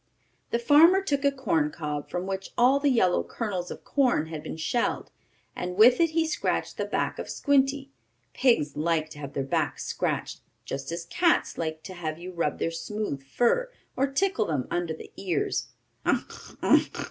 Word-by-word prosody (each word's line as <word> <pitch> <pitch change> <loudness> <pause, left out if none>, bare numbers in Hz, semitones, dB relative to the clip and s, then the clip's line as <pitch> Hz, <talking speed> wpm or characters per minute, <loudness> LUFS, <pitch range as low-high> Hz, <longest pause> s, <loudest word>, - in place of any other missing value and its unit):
The - - +1
farmer 320 +10 +6
took 285 -6 0
a 280 - +4
corn 165 - 0
cob, 150 -2 -5
from 180 +1 -3
which 195 0 -4
all 260 +3 +5
the 285 0 +2
yellow 205 -9 +3
kernels 190 -6 -4
of - - -8
corn 245 - +1
had 155 -2 -5
been 155 - -7
shelled, 235 +9 -1 0.4
and 180 0 -4
with 240 +5 +7
it 335 -1 +4
he 325 +1 +1
scratched 315 - -1
the - - -1
back - - -2
of - - -5
Squinty. 275 0 +1 0.4
Pigs 195 - +2
like 155 0 0
to 145 - -10
have 140 -1 -7
their 135 - -1
backs 135 - -1
scratched, - - -2 0.2
just 135 +3 -5
as 170 0 -4
cats 340 - +2
like 160 -1 -4
to 190 - -8
have 160 -3 -4
you 180 +2 -8
rub 170 -2 -1
their 165 - -1
smooth 165 -3 -4
fur, 240 - +1 0.3
or 275 - +2
tickle 275 - +1
them 145 -6 -1
under 175 -2 -1
the - - -12
ears. 180 -6 -1 0.4
"Ugh! - - -3
Ugh!" - - +6
185 Hz, 180 wpm, -27 LUFS, -, 0.4 s, with